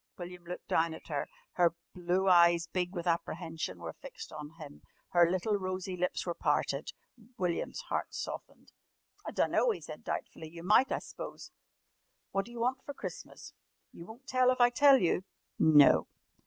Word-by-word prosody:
William 180 0 -8
looked 180 +1 -7
down 160 0 +1
at - - -14
her. 145 -2 -2 0.2
Her 170 -2 +2 0.2
blue 180 +2 0
eyes, 170 -2 +6
big 180 +2 -3
with 175 0 -4
apprehension, 165 - -2
were 85 -1 -7
fixed - - -10
on 150 -1 -7
him, 150 -3 -11 0.3
her 175 -1 +5
little 185 +4 0
rosy 185 -1 -4
lips 180 0 -1
were 175 - -1
parted. 145 -3 0 0.5
William's 180 - -2
heart - - -2
softened. - - -7 0.6
"I - - -3
dunno," - - +2
he 450 - -1
said - - -9
doubtfully. 160 - -5
"You 165 +1 -10
might, 215 +8 +4
I - - +1
s'pose. - - -8 0.8
What 195 0 0
d'you 240 0 -9
want 255 +2 0
for 285 - -7
Christmas?" - - -8 0.4
"You 170 - -11
won't 235 +5 -12
tell 255 -2 +3
if 255 - +1
I 245 0 +6
tell 280 +1 +7
you?" 180 -4 +1 0.4
"No." 145 - +6
180 Hz, 170 wpm, -31 LUFS, 165-205 Hz, 0.8 s, tell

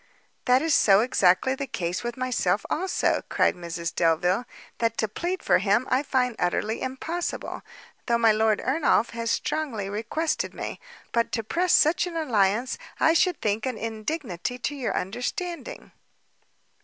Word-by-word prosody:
"That 255 +2 +4
is 325 -2 +2
so 195 -5 +6
exactly 220 0 +3
the 275 +1 -4
case 175 -5 -3
with 240 +1 -4
myself 240 -7 0
also," 370 +4 +1
cried - - +3
Mrs 170 -1 -5
Delvile, 175 +7 +2 0.3
"that 230 -1 0
to 220 - +1
plead 350 - -3
for - - +4
him, 205 +6 +2
I 255 +1 +3
find 255 -4 0
utterly 210 +5 -1
impossible, 315 +7 -4 0.5
though 235 -1 +3
my 230 -1 +5
Lord 215 0 +2
Ernolf 265 -5 +2
has 230 0 -3
strongly 230 -10 -2
requested 230 +10 -2
me; - - -5 0.3
but 235 -1 +1
to 225 - -1
press 345 - +1
such 320 +3 +4
an 345 - -7
alliance, 235 - +1 0.2
I 320 - +5
should 355 +1 +2
think 215 +3 0
an 255 -3 -3
indignity 225 - -4
to 260 +4 -3
your 265 -4 -2
understanding." 250 - -4
235 Hz, 155 wpm, -26 LUFS, 210-280 Hz, 0.5 s, so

